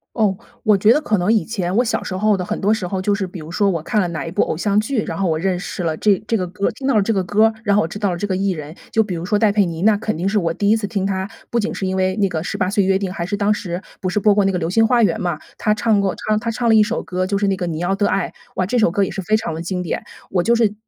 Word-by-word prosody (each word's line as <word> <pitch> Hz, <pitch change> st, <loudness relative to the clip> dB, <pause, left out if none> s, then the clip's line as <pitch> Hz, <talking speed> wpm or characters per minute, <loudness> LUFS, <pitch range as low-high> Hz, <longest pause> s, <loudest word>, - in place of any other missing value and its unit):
哦， 205 Hz, -5 st, +1 dB, 0.2 s
我 215 Hz, -3 st, +4 dB
觉 210 Hz, +4 st, +5 dB
得 300 Hz, -, +1 dB
可 215 Hz, -8 st, +1 dB
能 185 Hz, +5 st, +2 dB
以 220 Hz, -, +2 dB
前， 190 Hz, -5 st, -3 dB
我 240 Hz, -, +4 dB
小 240 Hz, -, -1 dB
时 185 Hz, -, -4 dB
候 210 Hz, +1 st, +2 dB
的 180 Hz, -, -3 dB
很 -, -, -3 dB
多 205 Hz, -, +2 dB
时 220 Hz, -4 st, 0 dB
候， 185 Hz, +1 st, -2 dB
就 205 Hz, +2 st, +1 dB
是 200 Hz, -1 st, -2 dB
比 180 Hz, -1 st, -8 dB
如 155 Hz, +1 st, -9 dB
说 200 Hz, +3 st, +1 dB
我 170 Hz, -3 st, -2 dB
看 210 Hz, +6 st, 0 dB
了 185 Hz, -, +1 dB
哪 155 Hz, -4 st, -4 dB
一 -, -, -5 dB
部 -, -, +2 dB
偶 -, -, -2 dB
像 200 Hz, +5 st, +1 dB
剧， 220 Hz, +1 st, -1 dB
然 -, -, -4 dB
后 195 Hz, -, 0 dB
我 160 Hz, -2 st, 0 dB
认 180 Hz, +1 st, 0 dB
识 180 Hz, -, -5 dB
了 160 Hz, -2 st, -1 dB
这 205 Hz, -3 st, +2 dB
这 225 Hz, -, +1 dB
个 185 Hz, -, -1 dB
歌 195 Hz, +3 st, -1 dB
听 270 Hz, -, -5 dB
到 275 Hz, -, +2 dB
了 210 Hz, -, +5 dB
这 210 Hz, +3 st, 0 dB
个 195 Hz, -3 st, +1 dB
歌 205 Hz, +5 st, +3 dB
儿， 225 Hz, -, +2 dB
然 205 Hz, -3 st, +2 dB
后 205 Hz, -, +4 dB
我 160 Hz, -, -1 dB
知 190 Hz, -, -7 dB
道 205 Hz, -3 st, 0 dB
了 175 Hz, -, -3 dB
这 205 Hz, -, -2 dB
个 185 Hz, -2 st, -1 dB
艺 195 Hz, 0 st, +1 dB
人。 155 Hz, -2 st, -6 dB, 0.2 s
就 220 Hz, -, +3 dB
比 195 Hz, -4 st, -4 dB
如 165 Hz, +1 st, -5 dB
说 205 Hz, +2 st, +1 dB
戴 215 Hz, -2 st, +4 dB
佩 205 Hz, -1 st, +3 dB
妮， 165 Hz, -1 st, -5 dB
那 210 Hz, +1 st, +4 dB
肯 215 Hz, +1 st, -2 dB
定 175 Hz, +5 st, -1 dB
是 210 Hz, -, 0 dB
我 170 Hz, -4 st, +1 dB
第 200 Hz, +4 st, 0 dB
一 220 Hz, -, +5 dB
次 220 Hz, -, -3 dB
听 200 Hz, -1 st, -2 dB
她， 190 Hz, -1 st, -1 dB, 0.2 s
不 235 Hz, -, 0 dB
仅 220 Hz, -, -2 dB
是 190 Hz, -, -3 dB
因 190 Hz, -, -1 dB
为 185 Hz, 0 st, +1 dB
那 200 Hz, -2 st, +2 dB
个 165 Hz, -, -2 dB
《十 165 Hz, -, -4 dB
八 185 Hz, -, +1 dB
岁 200 Hz, 0 st, +2 dB
约 190 Hz, 0 st, +2 dB
定》， 195 Hz, -, -2 dB
还 170 Hz, -3 st, -3 dB
是 200 Hz, +3 st, -2 dB
当 205 Hz, +1 st, +1 dB
时 180 Hz, -4 st, -3 dB, 0.2 s
不 185 Hz, -, -3 dB
是 185 Hz, +3 st, 0 dB
播 205 Hz, 0 st, +4 dB
过 205 Hz, -1 st, +3 dB
那 195 Hz, -, +2 dB
个 185 Hz, -, -1 dB
《流 165 Hz, -, -1 dB
星 225 Hz, +5 st, +4 dB
花 245 Hz, 0 st, +3 dB
园》 195 Hz, -7 st, +2 dB
嘛， 175 Hz, -4 st, -2 dB, 0.2 s
她 210 Hz, -, +2 dB
唱 215 Hz, -1 st, +2 dB
过 195 Hz, -2 st, 0 dB
唱 215 Hz, 0 st, +3 dB
她 230 Hz, +1 st, -2 dB
唱 235 Hz, +1 st, 0 dB
了 225 Hz, -, +6 dB
一 215 Hz, -, +7 dB
首 230 Hz, +2 st, -2 dB
歌， 185 Hz, 0 st, -2 dB
就 200 Hz, +1 st, -1 dB
是 200 Hz, -, +1 dB
那 195 Hz, -, +2 dB
个 180 Hz, -, -2 dB
《你 160 Hz, -1 st, -3 dB
要 175 Hz, +3 st, 0 dB
的 205 Hz, +1 st, +1 dB
爱》， 195 Hz, -, 0 dB, 0.3 s
哇， 185 Hz, -, 0 dB
这 245 Hz, -, 0 dB
首 215 Hz, -7 st, +3 dB
歌 200 Hz, +3 st, +1 dB
也 190 Hz, -, -1 dB
是 -, -, -6 dB
非 215 Hz, +5 st, +2 dB
常 215 Hz, -6 st, -1 dB
地 165 Hz, -, -5 dB
经 180 Hz, +1 st, -2 dB
典。 175 Hz, -, -3 dB, 0.3 s
我 180 Hz, -2 st, +1 dB
就 235 Hz, -, +3 dB
是 225 Hz, -3 st, +2 dB
195 Hz, 385 characters per minute, -20 LUFS, 180-215 Hz, 0.3 s, 一